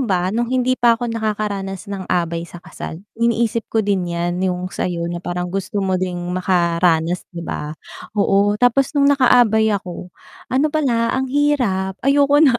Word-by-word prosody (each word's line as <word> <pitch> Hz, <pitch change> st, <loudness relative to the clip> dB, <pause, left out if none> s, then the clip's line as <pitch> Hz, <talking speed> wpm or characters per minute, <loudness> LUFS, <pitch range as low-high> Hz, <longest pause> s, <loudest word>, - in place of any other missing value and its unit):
ba 185 Hz, -4 st, 0 dB
nung 235 Hz, +1 st, 0 dB
hindi 255 Hz, 0 st, +2 dB
pa 240 Hz, -1 st, +5 dB
ako 240 Hz, +1 st, -3 dB
nakakaranas 210 Hz, -3 st, -3 dB
ng 195 Hz, -2 st, -5 dB
abay 170 Hz, -1 st, -1 dB
sa 175 Hz, -, -11 dB
kasal, 165 Hz, -1 st, -8 dB, 0.2 s
iniisip 230 Hz, -1 st, +1 dB
ko 220 Hz, -, +3 dB
din 195 Hz, -3 st, +1 dB
yan 175 Hz, +1 st, -2 dB
yung 180 Hz, 0 st, -2 dB
sa'yo 170 Hz, -2 st, -2 dB
na 175 Hz, 0 st, -4 dB
parang 180 Hz, 0 st, -3 dB
gusto 195 Hz, +1 st, -2 dB
mo 190 Hz, -1 st, +1 dB
din 180 Hz, -1 st, -2 dB, 0.2 s
makaranas, 170 Hz, -2 st, +1 dB
di 170 Hz, -, -5 dB
ba. 150 Hz, 0 st, -4 dB, 0.4 s
Oo 205 Hz, 0 st, +3 dB
tapos 245 Hz, +4 st, +3 dB
nung 280 Hz, 0 st, +4 dB
nakaabay 240 Hz, -5 st, +4 dB
ako, 180 Hz, -2 st, -6 dB, 0.4 s
ano 270 Hz, +4 st, +3 dB
pala 240 Hz, -7 st, +1 dB
ang 265 Hz, 0 st, -1 dB
hirap 245 Hz, -11 st, +1 dB
ayoko 285 Hz, +1 st, +4 dB
na. 255 Hz, -4 st, +5 dB
200 Hz, 165 wpm, -19 LUFS, 180-240 Hz, 0.4 s, pa